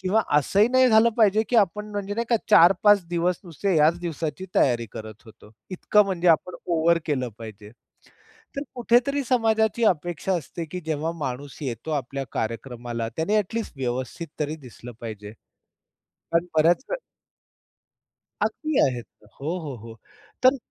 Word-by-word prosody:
किंवा 195 Hz, +4 st, +2 dB, 0.2 s
असंही 200 Hz, -, +3 dB
नाही 255 Hz, 0 st, +4 dB
झालं 220 Hz, 0 st, +6 dB
पाहिजे, 215 Hz, -1 st, +4 dB
की 245 Hz, -, +1 dB
आपण 210 Hz, 0 st, +1 dB
म्हणजे 205 Hz, -1 st, -4 dB
नाही 235 Hz, +2 st, -1 dB
का 235 Hz, -, +5 dB
4-5 195 Hz, +3 st, +6 dB
दिवस 175 Hz, 0 st, 0 dB
नुसते 180 Hz, +2 st, -1 dB
याच 155 Hz, +3 st, +4 dB
दिवसाची 165 Hz, +1 st, -4 dB
तयारी 120 Hz, -3 st, +2 dB
करत 110 Hz, -1 st, -9 dB
होतो, 110 Hz, -1 st, -16 dB, 0.2 s
इतकं 210 Hz, +3 st, +3 dB
म्हणजे 180 Hz, -2 st, 0 dB
आपण 170 Hz, +2 st, +3 dB
ओव्हर 170 Hz, 0 st, +3 dB
केलं 130 Hz, -5 st, -1 dB
पाहिजे. 110 Hz, -2 st, -10 dB, 0.9 s
तर 280 Hz, -, -2 dB
कुठेतरी 245 Hz, +4 st, +2 dB
समाजाची 225 Hz, -2 st, +2 dB
अपेक्षा 175 Hz, +2 st, -2 dB
असते, 170 Hz, +1 st, -6 dB
की 180 Hz, +3 st, -7 dB
जेव्हा 160 Hz, +1 st, -1 dB
माणूस 140 Hz, -1 st, -5 dB
येतो 125 Hz, +3 st, -5 dB
आपल्या 135 Hz, -1 st, -3 dB
कार्यक्रमाला, 115 Hz, 0 st, -4 dB
त्याने 180 Hz, +7 st, +1 dB
ॲट 210 Hz, +1 st, -3 dB
लीस्ट 230 Hz, -1 st, -3 dB
व्यवस्थित 130 Hz, +5 st, -3 dB
तरी 150 Hz, +1 st, -2 dB
दिसलं 125 Hz, -4 st, -12 dB
पाहिजे. 110 Hz, -3 st, -7 dB, 0.8 s
कारण 170 Hz, +1 st, -2 dB
बऱ्याच 165 Hz, +8 st, +4 dB, 1.6 s
अगदी 310 Hz, -2 st, -1 dB
आहेत. 125 Hz, -3 st, -4 dB, 0.3 s
हो, 160 Hz, +6 st, -2 dB
हो, 150 Hz, -6 st, -6 dB
हो 115 Hz, 0 st, -11 dB, 0.5 s
तर, 260 Hz, +2 st, +6 dB
170 Hz, 145 wpm, -24 LUFS, 130-205 Hz, 1.6 s, झालं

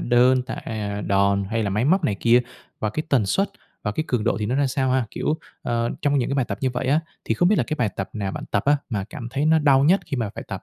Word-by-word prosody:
đơn, 125 Hz, +1 st, +4 dB
tạ, 130 Hz, -, -5 dB
à, 105 Hz, -2 st, -4 dB
đòn 100 Hz, 0 st, +2 dB
hay 115 Hz, -1 st, 0 dB
là 100 Hz, -, -1 dB
máy 105 Hz, +4 st, 0 dB
móc 180 Hz, +5 st, +3 dB
này 105 Hz, -, +1 dB
kia? 120 Hz, +1 st, +5 dB, 0.4 s
Và 110 Hz, -, 0 dB
cái 155 Hz, -, -2 dB
tần 125 Hz, -9 st, +2 dB
suất 195 Hz, -, +1 dB, 0.3 s
và 105 Hz, -, -1 dB
cái 155 Hz, -, -2 dB
cường 120 Hz, -3 st, 0 dB
độ 115 Hz, -, +1 dB
thì 105 Hz, -, -2 dB
nó 120 Hz, -, -1 dB
ra 140 Hz, +1 st, +2 dB
sao 130 Hz, 0 st, 0 dB
ha? 130 Hz, -2 st, +1 dB
Kiểu, 155 Hz, -, -1 dB, 0.2 s
ờ, 115 Hz, 0 st, 0 dB
trong 145 Hz, -1 st, +2 dB
những 120 Hz, -, 0 dB
cái -, -, 0 dB
bài 135 Hz, -2 st, +2 dB
tập -, -, -5 dB
như 130 Hz, -, +1 dB
vậy 125 Hz, +1 st, -3 dB
á, 145 Hz, +4 st, +3 dB, 0.2 s
thì -, -, 0 dB
không 175 Hz, -, +3 dB
biết 210 Hz, -, +3 dB
là -, -, +2 dB
cái 155 Hz, -, -1 dB
bài 120 Hz, -, +2 dB
tập 95 Hz, -, -4 dB
nào 100 Hz, -3 st, -3 dB
bạn -, -, -5 dB
tập 100 Hz, -, +1 dB
á 145 Hz, +1 st, +5 dB
mà 105 Hz, -6 st, -2 dB
cảm 125 Hz, -7 st, -6 dB
thấy 140 Hz, +4 st, -1 dB
nó 160 Hz, 0 st, +5 dB
đau 140 Hz, -3 st, +4 dB
nhất 185 Hz, +6 st, +4 dB
khi 140 Hz, -, -3 dB
mà 115 Hz, -4 st, -1 dB
phải -, -, -7 dB
tập? -, -, -5 dB
125 Hz, 305 wpm, -23 LUFS, 105-145 Hz, 0.4 s, kia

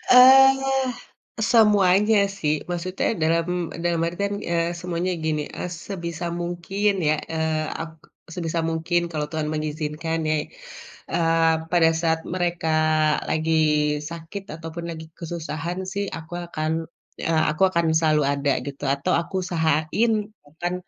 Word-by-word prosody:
Eee, 270 Hz, +1 st, +7 dB, 0.6 s
semuanya 210 Hz, -2 st, +5 dB, 0.2 s
sih, 150 Hz, -5 st, +1 dB, 0.2 s
maksudnya 180 Hz, +1 st, -2 dB, 0.2 s
dalam 165 Hz, +2 st, 0 dB
dalam 170 Hz, -1 st, +1 dB
artian, 200 Hz, +4 st, -2 dB
eee, 170 Hz, 0 st, 0 dB
semuanya 180 Hz, +1 st, -2 dB
gini, 155 Hz, -1 st, 0 dB
eee, 180 Hz, -, -4 dB, 0.2 s
sebisa 170 Hz, -3 st, -4 dB
mungkin 175 Hz, +4 st, -1 dB, 0.2 s
ya, 155 Hz, -, +4 dB, 0.2 s
eee, 160 Hz, -1 st, 0 dB, 0.2 s
ap 165 Hz, 0 st, -4 dB, 0.4 s
sebisa 165 Hz, -1 st, -2 dB
mungkin 165 Hz, +2 st, 0 dB
kalau 150 Hz, -1 st, -2 dB
Tuhan 155 Hz, -1 st, -2 dB
mengizinkan 155 Hz, +1 st, -3 dB
ya, 155 Hz, -, +2 dB, 0.8 s
eee, 165 Hz, -1 st, +3 dB, 0.2 s
pada 165 Hz, -2 st, +5 dB
saat 160 Hz, -1 st, +1 dB
mereka 175 Hz, -3 st, 0 dB, 0.5 s
lagi 160 Hz, +1 st, 0 dB, 0.6 s
sakit 170 Hz, +4 st, -7 dB
ataupun 165 Hz, +1 st, -7 dB
lagi 160 Hz, -1 st, -7 dB
kesusahan 170 Hz, 0 st, -4 dB
sih 200 Hz, 0 st, -1 dB
aku 160 Hz, +1 st, -10 dB
akan 155 Hz, -2 st, -2 dB, 0.5 s
eee, 160 Hz, -1 st, +1 dB
aku 155 Hz, +4 st, -2 dB
akan 170 Hz, -2 st, +1 dB
selalu 155 Hz, -2 st, +3 dB
ada 140 Hz, 0 st, +1 dB
gitu, 140 Hz, 0 st, -6 dB
atau 140 Hz, -, -1 dB
aku 170 Hz, -, -10 dB
usahain 160 Hz, +6 st, +1 dB, 0.5 s
akan 175 Hz, +1 st, -2 dB
165 Hz, 125 wpm, -24 LUFS, 160-180 Hz, 0.8 s, Eee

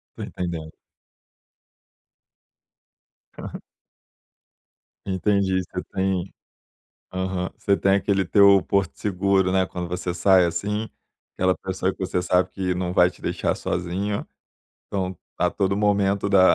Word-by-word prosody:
Tô -, -, -6 dB
entendendo. 85 Hz, -3 st, -5 dB, 2.7 s
Aham. -, -, -7 dB, 1.4 s
Entendi, 95 Hz, -1 st, +1 dB
você 90 Hz, +1 st, -6 dB
tem 95 Hz, -1 st, -1 dB, 0.8 s
Aham. 95 Hz, 0 st, -2 dB
Você 100 Hz, -, +2 dB
tem 95 Hz, 0 st, +2 dB
aquele 100 Hz, -1 st, +1 dB
teu 100 Hz, +1 st, +6 dB
porto 100 Hz, -2 st, 0 dB
seguro, 95 Hz, -1 st, +1 dB
né, 95 Hz, 0 st, +3 dB
quando 90 Hz, -1 st, -5 dB
você 90 Hz, 0 st, -3 dB
sai, 90 Hz, +1 st, +5 dB
assim, 105 Hz, +6 st, -2 dB, 0.5 s
aquela 95 Hz, 0 st, +1 dB
pessoa 95 Hz, 0 st, -2 dB
que -, -, -15 dB
você 95 Hz, -1 st, -1 dB
sabe 90 Hz, +1 st, +2 dB
que 90 Hz, -2 st, -2 dB
não 90 Hz, 0 st, -2 dB
vai 90 Hz, 0 st, +5 dB
te -, -, -18 dB
deixar -, -, -1 dB
sozinha. 95 Hz, +4 st, -2 dB, 0.6 s
Então, 95 Hz, -3 st, -3 dB, 0.2 s
a -, -, +2 dB
todo 100 Hz, 0 st, 0 dB
momento 100 Hz, -1 st, +2 dB
da 95 Hz, -2 st, +6 dB
95 Hz, 125 wpm, -24 LUFS, 90-100 Hz, 2.7 s, teu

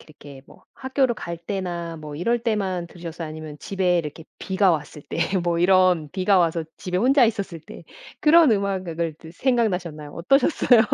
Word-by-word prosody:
이렇게 145 Hz, -3 st, -14 dB
뭐 -, -, -19 dB
학교를 260 Hz, -2 st, 0 dB
갈 170 Hz, -4 st, -6 dB
때나 170 Hz, -2 st, -4 dB
뭐 150 Hz, -2 st, -8 dB
이럴 230 Hz, +9 st, +1 dB
때만 195 Hz, -6 st, -1 dB
들으셨어요? 170 Hz, -1 st, -7 dB
아니면 155 Hz, -1 st, -8 dB
집에 185 Hz, -1 st, 0 dB
이렇게 155 Hz, 0 st, -5 dB
비가 190 Hz, -1 st, +2 dB
왔을 150 Hz, -1 st, -3 dB
때 -, -, -4 dB, 0.2 s
뭐 170 Hz, -1 st, 0 dB
이런 180 Hz, -3 st, +3 dB
비가 190 Hz, 0 st, +2 dB
와서 165 Hz, -1 st, +1 dB
집에 180 Hz, -1 st, -4 dB
혼자 260 Hz, +4 st, +5 dB
있었을 200 Hz, -7 st, -2 dB
때 160 Hz, -, -12 dB, 0.4 s
그런 315 Hz, -1 st, +6 dB
음악 195 Hz, -2 st, -1 dB
악을 165 Hz, -1 st, -3 dB
그 160 Hz, -, -12 dB
생각나셨나요? 180 Hz, -, -1 dB
어떠셨어요? 250 Hz, -, +3 dB
180 Hz, 360 characters per minute, -23 LUFS, 165-205 Hz, 0.4 s, 그런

